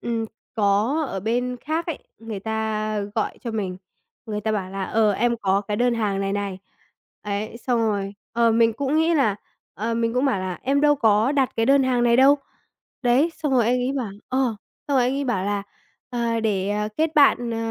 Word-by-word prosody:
ừm, 230 -1 -2 0.3
có 220 +9 +2
ở 195 - -4
bên 245 +4 -1
khác 320 +3 -2
ấy, 330 - -3 0.2
người 225 -3 -6
ta 215 0 -2 0.2
gọi 220 - -2
cho 235 - -4
mình, 200 -5 -3 0.5
người 210 -1 -3
ta 220 +1 -1
bảo 190 -3 -2
là 195 0 -3
"Ờ, 215 +1 +2
em 235 +3 +1
có 195 0 +2
cái 210 - -1
đơn 245 +1 +2
hàng 205 -4 -1
này 195 0 -1
này." 200 -2 -3 0.6
Ấy, 210 +2 -4
xong 245 0 0
rồi, 205 -3 -1 0.2
ờ, 235 0 +3
mình 230 0 +4
cũng 280 +5 -1
nghĩ 325 +1 +3
là 220 -10 +2 0.4
ờ, 225 +3 -2
mình 230 0 0
cũng 255 +3 +2
bảo 255 -9 +1
là 185 -1 -4
"Em 275 +2 +2
đâu 295 0 +5
có 225 0 +3
đặt 270 -3 +2
cái 225 - +1
đơn 275 +1 +5
hàng 255 -2 +1
này 235 -1 +4
đâu." 275 +3 +6 0.6
Đấy, 260 +7 +3
xong 300 -4 -2
rồi 250 -3 +4
anh 245 +3 +2
ấy 255 +2 0
bảo 250 -7 -3 0.2
ờ, 255 -4 0 0.3
xong 280 - +2
rồi 255 - +4
anh 255 - +1
ấy 280 0 -1
bảo 215 -7 -1
là 205 0 -1 0.5
"Ờ, 235 -2 -1
để 205 -2 0 0.2
kết 320 0 0
bạn, 270 -5 +4
ờ, 230 - -2
230 Hz, 215 wpm, -23 LUFS, 210-260 Hz, 0.6 s, đâu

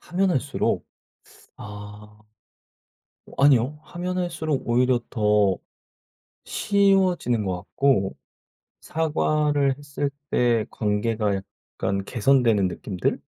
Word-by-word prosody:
하면 190 +1 0
할수록. 140 -2 -1 0.7
아 105 0 -10 1.2
아니요. 140 +1 +4
하면 180 +1 -4
할수록 160 -7 -2
오히려 125 +1 +3
더 105 -4 +2 0.9
쉬워지는 190 - +2
것 95 -2 -1
같고 100 0 0 0.7
사과를 150 -3 +1
했을 145 0 -3 0.2
때 120 -3 +2
관계가 105 0 0
약간 95 0 -5
개선되는 115 -5 +3
느낌들? 90 0 -3
125 Hz, 195 characters per minute, -24 LUFS, 105-150 Hz, 1.2 s, 아니요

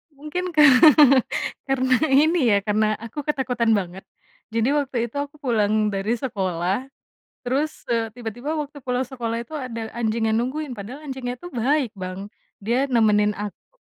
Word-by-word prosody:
Mungkin 345 +5 -4
ka 300 - +7 1.0
karena 260 -1 +2
ini 310 +5 +4 0.2
ya, - - +4
karena 215 +1 +1
aku 230 +6 -7
ketakutan 250 -6 +1
banget. 190 -1 -4 0.5
Jadi 230 +2 +1
waktu 280 -3 -1
itu - - -22
aku 285 +1 -5
pulang 215 -3 +1
dari 200 +4 -1
sekolah, 195 -2 -2 0.6
terus, 285 +5 -2
eee, 230 -2 -1
tiba 230 0 -6
tiba 275 +5 -4
waktu 290 -2 -7
pulang 250 0 -1
sekolah 235 -3 -4
itu 240 +6 -8
ada 235 -5 -5
anjing 225 -1 0
yang 220 - +1
nungguin 260 +3 -2
padahal 230 +7 -8
anjingnya 250 -2 -5
tuh 350 - -9
baik, 255 0 0
Bang, 185 +1 -6 0.3
dia 245 +7 0
nemenin 210 -3 +3
aku. 210 - -8
240 Hz, 155 wpm, -23 LUFS, 215-275 Hz, 1.0 s, ka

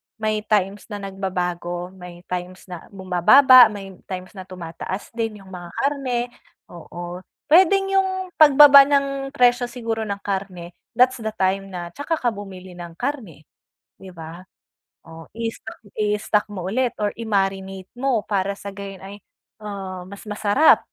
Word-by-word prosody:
May 215 -1 -1
times 205 -1 0
na 210 - -6
nagbabago, 180 -2 -4
may 180 -2 -12
times 180 +1 -5
na 175 - -8
bumababa, 205 +8 +6
may 195 -3 -9
times 185 -1 -6
na 185 - -9
tumataas 185 +2 -7
din 225 -3 -4
'yung 190 - -15
mga 175 -2 -9
karne, 255 -4 -1 0.4
oo, 175 +1 -8 0.3
puwedeng 390 +3 +5
'yung 375 -1 -2
pagbaba 285 -2 +9
ng 275 -1 0
presyo 245 -1 +3
siguro 230 -2 -4
ng 200 -1 -5
karne, 190 -3 -4 0.2
that's 250 0 +3
the 220 -1 -4
time 195 +1 0
na 175 -2 -7
tsaka 285 - -2
ka 245 -6 -1
bumili 190 -3 -10
ng 170 -1 -9
karne, 225 - -5 0.5
di 190 - -12
ba? 165 +1 -10 0.6
Oh, 165 -1 -12
i-stock 225 -1 -6 0.2
i-stock 210 0 0
mo 205 -4 -7
ulit 250 +2 0
or 205 -1 -1
i-marinate 195 -3 -2
mo 250 -5 +1
para 200 -1 -1
sa 200 0 -8
gayon 195 -1 -9
ay, 200 +1 -10 0.4
ah, 190 -3 -7
mas 200 +1 -11
masarap, 210 +7 +4
200 Hz, 145 wpm, -22 LUFS, 185-240 Hz, 0.6 s, pagbaba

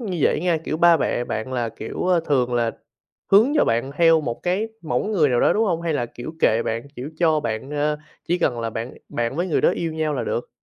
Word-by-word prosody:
như 190 -7 -3
vậy 150 - +2
nha, 175 -2 +1
kiểu, 155 - -2
ba 170 0 +6
mẹ 120 -3 -1
bạn 115 +3 -4
là, 120 -2 -1
kiểu, 115 - -5
ơ, 180 -2 +3
thường 125 -4 +1
là 120 -1 +1 0.6
hướng 225 +9 +6
cho - - +4
bạn 120 +4 0
theo 165 -1 +5
một 120 -5 -4
cái 190 +5 0
mẫu 160 - -1
người 195 -9 +2
nào 125 -2 +2
đó, - - +4
đúng 225 +2 +2
hông? 170 -4 -1
Hay 170 -1 0
là, 120 -5 -1
kiểu, 120 +5 -8
kệ 115 +1 +3
bạn, 115 +1 -2
kiểu, 130 +5 -6
cho 160 -2 +2
bạn, 115 +2 -4
a, 150 0 0 0.3
chỉ 175 - +1
cần 120 -8 0
là 115 0 -2
bạn 115 +3 -5
bạn 120 +3 -2
với 175 +2 0
người 175 - +1
đó - - +4
yêu 165 -2 -2
nhau 155 -1 -1
là 135 - -2
được? 120 - -3
150 Hz, 255 wpm, -22 LUFS, 120-170 Hz, 0.6 s, ba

